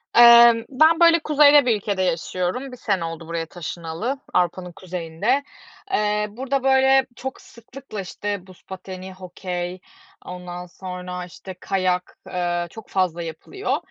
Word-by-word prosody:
Emm, 235 Hz, -1 st, +8 dB
ben 315 Hz, +5 st, +4 dB
böyle 335 Hz, 0 st, +6 dB
kuzeyde 295 Hz, -2 st, +6 dB
bir 235 Hz, -3 st, +3 dB
ülkede 200 Hz, -1 st, -2 dB
yaşıyorum. 185 Hz, +8 st, -2 dB
Bir 250 Hz, -, -10 dB
sene 195 Hz, -7 st, -1 dB
oldu 165 Hz, 0 st, -7 dB
buraya 165 Hz, 0 st, -3 dB
taşınalı, 175 Hz, -, -5 dB
Avrupa'nın 180 Hz, 0 st, 0 dB
kuzeyinde. 185 Hz, -, -2 dB, 0.5 s
Eee, 210 Hz, -, +1 dB
burada 265 Hz, +5 st, -2 dB
böyle 265 Hz, 0 st, +4 dB
çok 265 Hz, +1 st, -6 dB
sıklıkla 235 Hz, -2 st, -10 dB
işte, 200 Hz, 0 st, -5 dB
buz 185 Hz, -1 st, -17 dB
pateni, 190 Hz, 0 st, -8 dB
hokey, 180 Hz, -1 st, -5 dB, 0.5 s
ondan 180 Hz, 0 st, -7 dB
sonra 180 Hz, 0 st, -7 dB
işte, 185 Hz, +2 st, -10 dB
kayak, 185 Hz, -2 st, -1 dB
eee, 175 Hz, -1 st, -2 dB
çok 220 Hz, +4 st, -12 dB
fazla 180 Hz, -3 st, 0 dB
yapılıyor. 165 Hz, -, -3 dB
190 Hz, 135 wpm, -22 LUFS, 180-250 Hz, 0.5 s, Emm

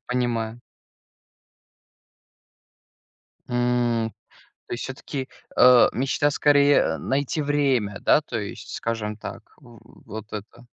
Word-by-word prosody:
Понимаю. 120 Hz, -2 st, -2 dB, 2.9 s
М, 120 Hz, -2 st, +1 dB, 0.6 s
то -, -, -9 dB
есть 120 Hz, -, -3 dB
всё-таки, 135 Hz, 0 st, -6 dB, 0.3 s
э, 125 Hz, -1 st, +7 dB
мечта 135 Hz, +3 st, +1 dB
скорее, 145 Hz, 0 st, +4 dB
э, -, -, 0 dB
найти 140 Hz, +3 st, -1 dB
время, 135 Hz, -8 st, +1 dB
да, -, -, +4 dB
то 120 Hz, -5 st, -4 dB
есть, 105 Hz, -2 st, -7 dB
скажем 110 Hz, -2 st, -3 dB
так, 105 Hz, -, -8 dB, 0.2 s
в 120 Hz, -6 st, -18 dB
вот 110 Hz, +1 st, -8 dB
это. 115 Hz, +3 st, -9 dB
120 Hz, 105 wpm, -24 LUFS, 115-135 Hz, 2.9 s, э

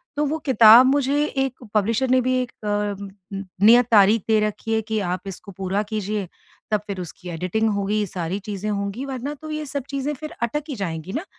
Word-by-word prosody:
तो 295 Hz, -, +1 dB
वो 305 Hz, +2 st, -1 dB
किताब 235 Hz, -2 st, +8 dB
मुझे 280 Hz, +2 st, +2 dB
एक 270 Hz, -3 st, -3 dB
पब्लिशर 225 Hz, +5 st, +1 dB
ने 255 Hz, -, +5 dB
भी 255 Hz, +1 st, 0 dB
एक 250 Hz, -, -5 dB
अ, 205 Hz, -1 st, -2 dB, 0.4 s
नि 195 Hz, 0 st, -4 dB, 0.2 s
नियत 240 Hz, +2 st, +7 dB
तारीख़ 210 Hz, 0 st, +5 dB
दे 220 Hz, -1 st, +4 dB
रखी 225 Hz, +2 st, -4 dB
है 220 Hz, -, +2 dB
कि 220 Hz, 0 st, -2 dB
आप 180 Hz, +1 st, -2 dB
इसको 195 Hz, +1 st, -8 dB
पूरा 195 Hz, +2 st, -2 dB
कीजिए 210 Hz, -2 st, -3 dB, 0.4 s
तब 210 Hz, -1 st, +2 dB
फिर 195 Hz, -2 st, -4 dB
उसकी 180 Hz, +1 st, -9 dB
एडिटिंग 180 Hz, +6 st, -1 dB
होगी, 205 Hz, +1 st, 0 dB
सारी 175 Hz, +1 st, -3 dB
चीज़ें 205 Hz, 0 st, -5 dB
होंगी 200 Hz, +5 st, -3 dB
वरना 270 Hz, +1 st, -4 dB
तो 310 Hz, 0 st, -7 dB
ये 305 Hz, 0 st, -3 dB
सब 280 Hz, -1 st, -4 dB
चीज़ें 280 Hz, +1 st, -2 dB
फिर 305 Hz, +2 st, -8 dB
अटक 295 Hz, +6 st, -1 dB
ही 280 Hz, -, -3 dB
जाएँगी 175 Hz, -4 st, -4 dB
ना। 305 Hz, +8 st, -3 dB
220 Hz, 205 wpm, -23 LUFS, 200-265 Hz, 0.4 s, किताब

